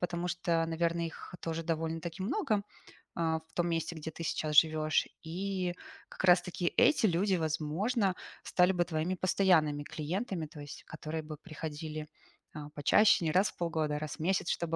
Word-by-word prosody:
Потому 175 0 -2
что, 170 -2 +1
наверно, 170 +1 0
их 165 +2 -9
тоже 165 0 -3
довольно-таки 165 +2 -3
много, 215 - 0 0.5
а, 160 -1 +1
в 160 - -27
том 175 0 0
месте, 165 0 -1
где 160 0 -6
ты 165 - -7
сейчас 155 -1 -1
живёшь. 155 -1 +4 0.2
И 180 +2 -2 0.4
как - - -7
раз-таки 175 -1 +3
эти 255 -7 +5
люди, 190 +2 +2
возможно, 180 - 0 0.3
стали 180 +1 +3
бы 175 -1 +1
твоими 170 +2 -1
постоянными 170 -6 +3
клиентами, 170 +4 -3
то 150 0 -12
есть 145 - -9
которые 155 +1 -5
бы 155 -1 -7
приходили, 155 -1 -6 0.5
а, 150 -1 -7
почаще, 170 +6 +4
не 155 - +2
раз 190 +4 +4
в - - -29
полгода, 160 -3 -1
а - - -3
раз 155 -1 -5
в - - -30
месяц, 175 +2 +1
чтобы 165 -1 -1
165 Hz, 170 wpm, -32 LUFS, 155-180 Hz, 0.5 s, эти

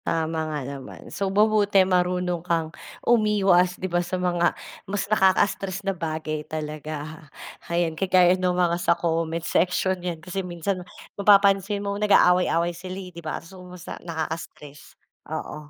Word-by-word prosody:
Tama 160 0 -1
nga 150 -1 -3
naman. 140 0 -9
So 195 -1 -1
mabuti 205 0 +3
marunong 180 -1 0
kang 165 -2 -1 0.3
umiwas, 195 -6 +3
'di - - -5
ba, 175 -1 0
sa 180 +1 -3
mga 175 -1 +1 0.3
mas 200 -1 -1
nakaka-stress 195 -1 +1
na 195 - +1
bagay 155 -3 -3
talaga. 155 0 -6 0.4
Ayan, 170 -1 0
kagaya 180 +1 +4
ng 185 0 0
mga 175 -1 +2
sa 170 -1 +2
comment 165 0 -1
section 185 +2 +1
'yan, 175 -2 -3
kasi 180 +4 -5
minsan 180 +1 -3 0.4
mapapansin 200 0 +4
mo 200 - -1
nag-aaway-away 180 -4 +4
sila, 185 +2 -7
eh, 185 -2 -8
'di 170 - -9
ba, 160 +1 -5
so 185 +2 -13 0.2
sa 175 - -9
nakakastress. 160 -3 -7 0.3
Oo, 150 -1 -6
180 Hz, 145 wpm, -24 LUFS, 165-190 Hz, 0.4 s, kagaya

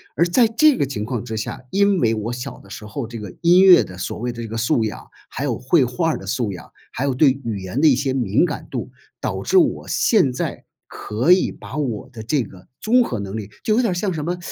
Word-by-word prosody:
而 170 - +3
在 225 +7 +4
这 290 +6 +4
个 140 - +1
情 125 -6 -4
况 115 0 -3
之 110 - -5
下， 110 +4 -5
因 200 -1 +3
为 115 -4 +2
我 110 +1 -3
小 125 +3 -7
的 100 - -18
时 105 +1 -9
候 115 +5 -5
这 115 0 -8
个 105 -4 -8
音 175 +2 +6
乐 185 -2 +8
的 90 -1 -11
所 90 - -5
谓 120 +2 -2
的 120 0 -8
这 115 - -6
个 110 - -7
素 115 0 +1
养， 105 - -7 0.2
还 135 - -5
有 125 -6 -1
绘 135 +3 +3
画 160 +7 0
儿 - - -2
的 - - -10
素 120 -6 -1
养， 85 - -11 0.2
还 130 - -3
有 140 -1 +1
对 135 +1 +3
语 110 -4 -3
言 95 +9 -3
的 160 - +6
一 130 - +4
些 135 0 -1
敏 125 - +2
感 - - -5
度， - - -5 0.3
导 - - -3
致 - - +2
我 355 - +2
现 210 - +3
在 125 - -4 0.2
可 115 +10 -1
以 185 - +2
把 - - -10
我 130 -3 -3
的 115 -3 -9
这 135 +3 0
个 95 -3 -14
综 245 +3 +3
合 120 - -4
能 100 +1 -5
力 105 -2 -6 0.2
就 215 - +2
有 245 - +3
点 230 -5 +1
儿 - - 0
像 185 +2 -1
什 155 -2 -4
么， 175 +2 -2
130 Hz, 285 characters per minute, -21 LUFS, 110-170 Hz, 0.3 s, 乐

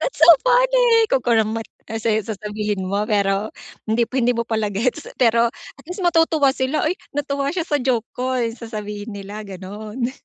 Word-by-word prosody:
"That's - - -3
so - - +7 0.2
funny." - - +4 0.3
Kunkunam 230 -4 +2
met. 225 - -5 0.2
Tapos, 220 0 -5
eh, 220 -1 +2
sasabihin 210 -1 -3
mo 200 +2 0
pero 200 -1 0 0.4
hindi 230 +1 +2
mo - - -40
hindi 245 -1 +3
mo 235 -1 -2
pala 220 -2 -1
gets. 230 +6 -1
Pero 235 -1 +4
at 275 - -16
least 360 +3 -6
matutuwa 325 -5 +3
sila, 265 +4 0
"Ay, 330 - +1 0.2
natuwa 280 -1 -1
siya 345 -2 -2
sa 295 -3 +1
joke 240 -3 0
ko." 255 +1 -1 0.2
Sasabihin 210 -2 -7
nila, 205 +2 -7
gano'n. 210 +6 -5
230 Hz, 175 wpm, -21 LUFS, 210-275 Hz, 0.4 s, so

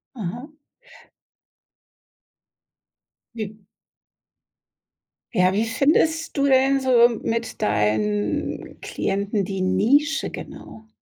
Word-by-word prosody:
Mhm. 245 - -7 2.8
Wie 215 -2 -6 1.8
ja, 185 -3 +3
wie 215 +3 +1
findest 315 +7 +1
du 280 - +2
denn 270 0 +4
so 245 -2 +5
mit 230 0 -3
deinen 105 0 -1
Klienten 200 +1 -2
die 195 0 -4
Nische 255 +10 +2
genau? 220 0 -10
225 Hz, 75 wpm, -23 LUFS, 185-270 Hz, 2.8 s, so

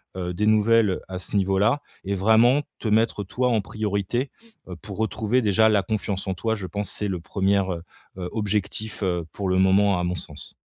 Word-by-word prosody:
heu, 90 -1 -3
des 105 +4 -1
nouvelles, 110 0 +4
heu, 90 - -3
à 95 - -4
ce 95 - -6
niveau-là 100 +7 +2 0.2
et 100 +1 -1
vraiment 110 +8 +4 0.2
te 115 - -4
mettre 110 -1 +2
toi 125 +6 0
en 115 -2 +2
priorité, 105 +5 -2 0.4
heu, 90 - -6
pour 100 +2 -9
retrouver 110 +2 0
déjà 110 0 +4
la 105 -2 +3
confiance 100 -1 -3
en 95 - 0
toi, 110 +5 -1
je 100 -4 -6
pense, 100 +2 -4
c'est 105 -1 -2
le 90 - -2
1re, 95 +2 0
heu, 85 - -6 0.5
objectif 105 0 -2 0.3
pour 100 -2 -3
le 95 - +2
moment 95 0 +4
à - - -1
mon 90 +1 -1
sens. - - -8
105 Hz, 195 wpm, -24 LUFS, 95-110 Hz, 0.5 s, nouvelles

